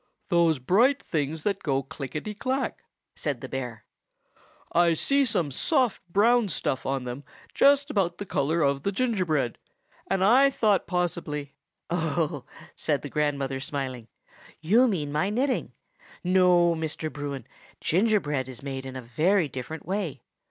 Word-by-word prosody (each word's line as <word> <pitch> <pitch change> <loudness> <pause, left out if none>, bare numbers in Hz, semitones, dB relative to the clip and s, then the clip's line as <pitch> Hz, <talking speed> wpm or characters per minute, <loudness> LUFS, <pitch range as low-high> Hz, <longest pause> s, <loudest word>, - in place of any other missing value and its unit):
"Those 170 -3 +4
bright 225 - +3
things 155 0 -2
that 200 -2 -1
go 135 -2 0
clickety 140 +8 -6
clack," 260 +5 -2 0.3
said 145 -6 -3
the 130 - -7
bear. 125 -4 -5 0.9
"I 170 -1 +4
see 275 - +2
some 165 - 0
soft 255 - +1
brown 225 +3 +4
stuff 135 -4 -2
on 135 -1 -1
them, 125 +3 -6 0.3
just 280 +1 +4
about 180 -6 0
the 205 - -5
color 160 0 +1
of 140 -1 +1
the 200 - -1
gingerbread, 185 - 0 0.5
and 195 -1 +1
I 255 +7 +6
thought 215 -7 +2
possibly—" 165 -5 -2 0.4
"Oh," 160 -3 -1 0.3
said 145 -3 0
the 145 - -5
grandmother, 140 -3 -1
smiling, 130 -4 -4 0.5
"you 220 +11 +4
mean 155 -10 -1
my 155 +7 +1
knitting. 255 +5 0 0.5
No, 180 -2 +4
Mr. 160 -1 -3
Bruin, 140 -4 -5 0.3
gingerbread 160 - +1
is 130 0 -9
made 135 -1 -5
in 130 - -8
a 130 - -6
very 160 - +2
different 135 +4 -7
way. 180 - -3
160 Hz, 145 wpm, -27 LUFS, 140-200 Hz, 0.9 s, I